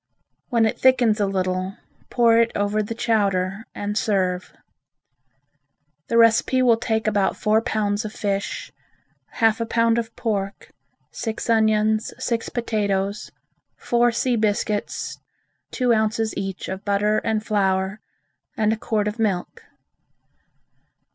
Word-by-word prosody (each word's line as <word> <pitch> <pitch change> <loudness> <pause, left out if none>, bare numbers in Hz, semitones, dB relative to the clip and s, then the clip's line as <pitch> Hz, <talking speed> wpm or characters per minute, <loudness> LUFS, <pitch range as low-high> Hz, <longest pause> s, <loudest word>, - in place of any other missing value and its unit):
When 235 -3 +3
it 220 - -1
thickens 245 -4 +4
a 205 - +2
little, 185 0 -2 0.3
pour 230 -2 +4
it 230 0 +3
over 205 +1 0
the 215 +2 -5
chowder 200 -3 0
and 205 0 -3
serve. 185 -4 0 1.6
The 230 - +1
recipe 230 +3 +4
will 240 -2 +5
take 220 -1 -1
about 205 -2 +1
four 215 +1 +2
pounds 210 -1 -1
of 215 - -5
fish, 200 -2 -3 0.6
half 225 -1 +2
a - - 0
pound 230 0 +2
of 230 0 -6
pork, 200 -4 -3 0.4
six 225 +1 -3
onions, 220 -1 +2
six 230 -2 -2
potatoes, 205 -4 -2 0.5
four 240 0 +2
sea 245 +1 0
biscuits, 210 -1 -1 0.5
two 250 -2 +2
ounces 220 0 0
each 195 -1 -4
of 190 +1 -5
butter 205 +1 +1
and 220 -1 -2
flour 195 -2 0 0.6
and 215 -1 +2
a - - -3
quart 215 -1 -1
of 210 +2 -4
milk. 195 -5 -1
215 Hz, 130 wpm, -23 LUFS, 200-230 Hz, 1.6 s, will